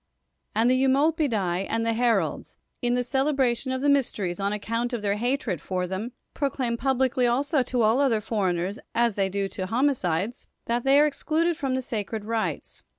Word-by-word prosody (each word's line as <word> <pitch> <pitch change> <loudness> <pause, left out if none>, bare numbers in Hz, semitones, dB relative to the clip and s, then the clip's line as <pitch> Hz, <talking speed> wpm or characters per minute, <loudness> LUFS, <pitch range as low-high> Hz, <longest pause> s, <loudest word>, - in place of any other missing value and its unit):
xVnd 225 +2 +3
the 255 +1 +3
Eumolpidffi 265 - +1
and 225 0 0
the 230 - +1
Heralds, 235 0 0 0.2
in 245 -1 +1
the 250 - +1
celebra 265 -1 +1
tion 260 +2 -5
of 260 +1 -2
the - - +2
mysteries, 210 -10 0
on 200 0 0
account 230 +4 -2
of 230 -3 -3
their 200 0 0
hatred 240 - -1
for 180 -1 -2
them, 190 +6 -4 0.2
proclaim 265 -4 -1
publicly 260 0 +1
also 275 +4 +1
to 250 -1 0
all 220 +4 +3
other 260 -6 +3
for 210 -3 -1
eigners, 180 +4 -2 0.2
as 235 -1 +3
they 195 -1 0
do 200 +1 -1
to 185 -1 -4
homicides, 225 - 0 0.2
that 235 +1 -1
they 275 +1 +6
are 300 - +6
excluded 315 +3 0
fro?n 270 -3 -2
the 260 - -2
sacred 215 -2 -4
rites. 225 0 -3
235 Hz, 190 wpm, -26 LUFS, 205-265 Hz, 0.2 s, they